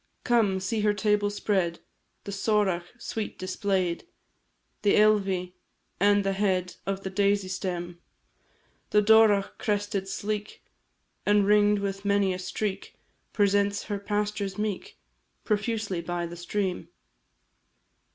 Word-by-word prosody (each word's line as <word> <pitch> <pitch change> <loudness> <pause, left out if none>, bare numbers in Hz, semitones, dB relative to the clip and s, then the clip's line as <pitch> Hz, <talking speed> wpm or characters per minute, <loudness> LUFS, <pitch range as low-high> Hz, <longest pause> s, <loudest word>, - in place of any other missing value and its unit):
Come, 220 -6 +2
see 190 +4 -2
her 210 0 +2
table 210 -1 +2
spread; 190 -4 0 0.5
The 200 - -6
sorach 195 -3 +1
sweet 225 -2 -5
display'd 185 - -1 0.7
The 205 - +3
ealvi, 195 -4 +2 0.5
and 205 0 +4
the 195 0 0
head 190 -2 0
Of 195 0 -2
the 190 - -4
daisy 200 0 +1
stem; 175 -2 -4 0.9
The 210 0 +4
dorach 215 -2 +4
crested, 205 -2 -1
sleek, 210 +1 -4 0.6
And 205 -1 +3
ringed 210 0 +4
with 195 0 -3
many 200 -2 +2
a 180 - -5
streak, 195 +2 -4 0.4
Presents 200 -1 +2
her 205 -2 -4
pastures 205 -1 -2
meek, 210 -2 -4 0.5
Profusely 210 -4 -1
by 175 0 -3
the 170 0 -7
stream. 185 +2 -3
200 Hz, 120 wpm, -27 LUFS, 190-210 Hz, 0.9 s, and